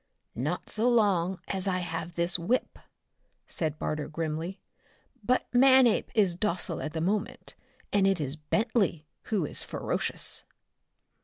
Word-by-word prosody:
"Not 150 +9 -3
so 225 +3 +2
long 190 -6 +2
as 195 0 -2
I 185 -1 +1
have 170 -1 -4
this 175 +1 +2
whip," 230 +10 -1 0.7
said 155 -2 -1
Barter 155 -1 -3
grimly. 165 +4 -4 0.6
"But 250 +5 +2
Manape 260 -2 +5
is 200 -5 +4
docile 175 -3 -1
at 155 - -4
the 160 - -2
moment, 200 +5 -2 0.4
and 200 -1 +4
it 195 -3 +2
is 140 -1 -2
Bentley 180 +1 0 0.2
who 200 -8 0
is - - -1
ferocious." - - -1
180 Hz, 135 wpm, -28 LUFS, 165-210 Hz, 0.7 s, Manape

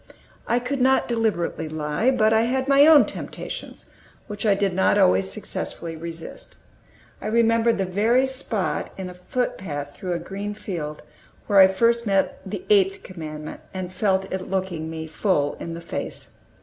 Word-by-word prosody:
I 240 - +2
could 250 +2 -2
not 265 +1 +3
deliberately 210 -9 -1
lie, 155 +9 0
but 220 -4 +3
I 220 - +4
had 260 +2 0
my 280 +1 +6
own 310 -3 +8
temptations, - - -7 0.4
which 210 0 -4
I 200 - +5
did 195 -1 0
not 190 +1 +3
always 95 +1 +4
successfully 165 -1 -5
resist. 165 - -8 0.6
I - - -4
remember 230 +1 +3
the 195 -4 -1
very 220 +8 +2
spot 255 -7 -2
in 185 -1 -5
a - - -10
footpath 180 - -4
through 180 -2 -3
a - - 0
green 200 +4 -5
field 160 -8 -5 0.4
where 200 -2 +4
I 190 - +10
first 230 +4 +2
met 195 -1 +1
the 210 - -6
Eighth 395 -1 +3
Commandment, 155 -4 -7
and 185 -1 -5
felt 190 0 +1
it 190 -1 -4
looking 185 -4 -2
me 160 0 -5
full 160 -3 0
in 165 0 -5
the 170 - -7
face. 170 - -6
195 Hz, 165 wpm, -24 LUFS, 170-235 Hz, 0.6 s, I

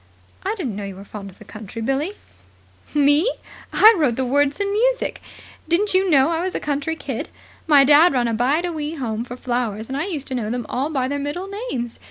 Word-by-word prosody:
"I 405 +3 -2
didn't 275 - -4
know 205 - -5
you 195 -1 -6
were 195 +1 -11
fond 200 -1 -8
of 185 - -17
the - - -14
country, 215 +1 -9
Billie." 270 - -1 0.8
"Me? 290 - +4 0.4
I 440 +2 +8
wrote 290 -10 +1
the 260 - -1
words 285 +4 +1
and 400 0 0
music. - - 0 0.5
Didn't 385 +5 +2
you 375 0 +3
know 280 0 +4
I 330 0 0
was 370 +1 -2
a - - 0
country 290 +2 -2
kid? - - -5 0.4
My 290 -3 +7
dad 295 +5 +6
ran 245 -3 +1
a 230 - -1
Bide 270 +9 +1
a 350 - -3
Wee 305 0 -4
Home 230 -6 -3
for 245 0 -8
flowers, 240 -3 -2
and 265 - -3
I 290 - -1
used 305 -8 -4
to - - -4
know 230 -4 -2
them 240 0 -3
all 270 +4 -2
by 265 -5 -1
their 285 +1 -2
middle 290 +7 -4 0.2
names. 240 -2 -4
280 Hz, 230 wpm, -21 LUFS, 240-330 Hz, 0.8 s, I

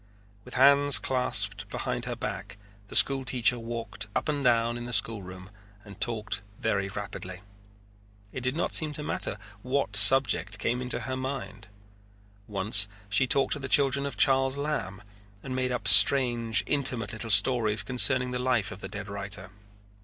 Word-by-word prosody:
With - - -12
hands 140 +2 +5
clasped 105 -7 0
behind - - -5
her - - -5
back - - -7 0.3
the - - -10
school 135 -1 +4
teacher 125 -2 +1
walked 115 -2 -6
up - - -2
and 145 -2 -3
down 120 -1 +1
in 120 0 -7
the 125 - -6
schoolroom 95 -4 -2 0.3
and 100 0 -15
talked 110 -2 -2 0.2
very 100 -3 -2
rapidly. 95 -2 -8 0.9
It 130 - -6
did 125 +3 -3
not 170 - -3
seem 155 -2 +2
to 150 - -7
matter 105 - -4 0.2
what 130 -4 -3
subject 110 - +5
came 120 +5 -3
into 125 0 -3
her 130 -1 -5
mind. 115 -6 -7 0.8
Once 105 0 0 0.2
she 125 +6 +1
talked 135 +2 +2
to 150 - -5
the 135 -1 -7
children 140 -1 +2
of 140 - -9
Charles 135 0 +2
Lamb 105 -10 -5 0.4
and 130 -1 -6
made 130 0 -2
up 125 - -4
strange, 120 -4 +5
intimate 125 -7 +1
little 115 0 -7
stories 105 0 +3
concerning 125 0 +2
the 125 - -4
life 120 -6 -1
of 95 - -11
the 95 - -8
dead 105 -1 -9
writer. 95 -2 -5
120 Hz, 165 wpm, -26 LUFS, 100-130 Hz, 0.9 s, hands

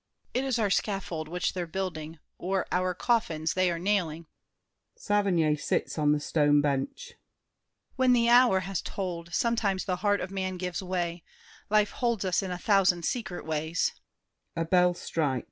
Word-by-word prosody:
It 255 - 0
is 265 -3 0
our 210 -4 +1
scaffold 190 -7 -1
which 180 +2 -1
they're 180 -2 -3
building, 165 -3 -4 0.2
or 190 +1 -1
Our 180 0 0
coffins 165 -8 0
they 185 -1 +2
are 170 - -1
nailing. 170 -3 -1 0.7
[Saverny 185 -7 +2
sits - - -1
on 150 -1 +3
the 150 - +2
stone 145 -1 +3
bench. 145 - -2 0.8
When 260 -1 +4
the 235 -1 +3
hour 240 -5 +6
Has 190 0 -3
tolled, 170 -3 -5
sometimes 210 -2 0
the 185 -2 -1
heart 205 +2 +1
of 185 - -5
man 190 -1 -3
gives 180 -1 -3
way. 175 -2 -3 0.5
Life 210 0 +3
holds 235 -5 -1
us 185 +1 +1
in 190 - -4
a 180 - -3
thousand 185 -4 +3
secret 220 -7 -3
ways. 160 +1 0
185 Hz, 150 wpm, -28 LUFS, 165-205 Hz, 0.8 s, hour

